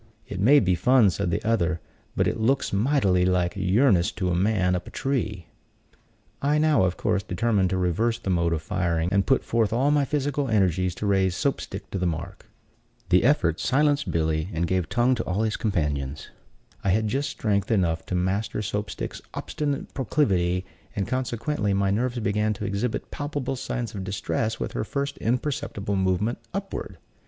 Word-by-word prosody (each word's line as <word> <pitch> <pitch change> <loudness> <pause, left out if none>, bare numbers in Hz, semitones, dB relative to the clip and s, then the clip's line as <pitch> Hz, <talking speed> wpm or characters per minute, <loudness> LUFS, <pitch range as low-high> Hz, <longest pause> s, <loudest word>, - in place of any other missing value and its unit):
"It 95 - -6
may 135 +9 +6
be 95 -6 +2
fun," 110 +4 +4
said 85 - -2
the 85 - -2
other, 90 -7 +1 0.4
"but - - +2
it - - -1
looks 125 +2 +1
mightily 100 -5 +2
like 90 -1 +1
yearnest 95 0 +3
to 90 -2 0
a - - +1
man 95 -1 +2
up 90 - -4
a - - -6
tree." 110 - -2 1.0
I 145 +2 +2
now, 150 -9 +4
of 90 - -1
course, 105 -2 +1
determined 100 0 +1
to 95 - 0
reverse 100 +6 +1
the 100 -5 -3
mode 85 -1 +1
of 80 -2 -1
firing, 85 -3 0
and 100 -1 +2
put 135 - +3
forth 115 -3 +1
all 130 +6 +2
my 145 -1 +3
physical 145 0 -1
energies 95 -4 +2
to - - -4
raise 95 -2 +2
Soap 140 +6 0
stick 100 +1 -8
to 95 - -2
the 90 - +1
mark. 85 +3 -5 0.6
The 90 - +4
effort 90 - +2
silenced 145 +1 +2
Billy, 80 +1 0
and 85 +1 0
gave 90 0 -1
tongue 120 +2 +3
to 115 -2 -1
all 95 +4 0
his 110 -1 0
companions. 75 -8 -2 0.5
I 100 - +1
had 110 +4 +2
just 135 +6 -1
strength 105 -7 -1
enough 85 -7 +1
to 90 - -2
master 95 +4 -1
Soap 105 +1 -3
stick's - - -5
obstinate 145 -2 -3
proclivity, 95 -10 +1 0.3
and, 100 -2 -1
consequently, 120 -4 -1
my 100 0 +2
nerves 120 +4 0
began 105 -1 0
to 105 0 -5
exhibit 100 +4 -2
palpable 145 -2 -3
signs 120 -2 -4
of 100 -3 -5
distress 110 +3 -2
with - - -3
her - - -2
first 140 +5 -3
imperceptible 125 -5 -2
movement 95 +4 0 0.2
upward. 195 0 -5
100 Hz, 185 wpm, -25 LUFS, 90-125 Hz, 1.0 s, may